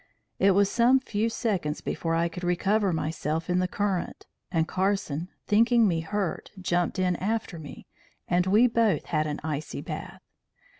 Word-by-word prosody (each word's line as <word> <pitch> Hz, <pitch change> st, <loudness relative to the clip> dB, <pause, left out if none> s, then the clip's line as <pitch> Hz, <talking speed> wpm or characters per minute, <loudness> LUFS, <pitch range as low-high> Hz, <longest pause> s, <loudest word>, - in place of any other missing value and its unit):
It 195 Hz, -1 st, +4 dB
was 200 Hz, 0 st, +4 dB
some 245 Hz, +5 st, +4 dB
few 225 Hz, -3 st, -1 dB
seconds 195 Hz, -10 st, -1 dB
before 165 Hz, -1 st, -2 dB
I 170 Hz, +1 st, +2 dB
could 180 Hz, +2 st, -8 dB
recover 195 Hz, +3 st, +1 dB
myself 160 Hz, +1 st, -2 dB
in 180 Hz, -, +2 dB
the 185 Hz, -, +1 dB
current, 195 Hz, -1 st, -2 dB, 0.3 s
and 165 Hz, -2 st, +1 dB
Carson, 185 Hz, -4 st, -1 dB, 0.2 s
thinking 230 Hz, +1 st, +4 dB
me 170 Hz, -4 st, +1 dB
hurt, 195 Hz, +2 st, -3 dB
jumped 175 Hz, 0 st, 0 dB
in 180 Hz, -1 st, +1 dB
after 215 Hz, -4 st, -2 dB
me, 150 Hz, -2 st, -10 dB, 0.4 s
and 180 Hz, +1 st, +2 dB
we 210 Hz, +6 st, +5 dB
both 230 Hz, -4 st, +2 dB
had 155 Hz, -1 st, 0 dB
an 150 Hz, -, -3 dB
icy 155 Hz, -1 st, -4 dB
bath. -, -, -7 dB
185 Hz, 160 wpm, -27 LUFS, 165-210 Hz, 0.4 s, we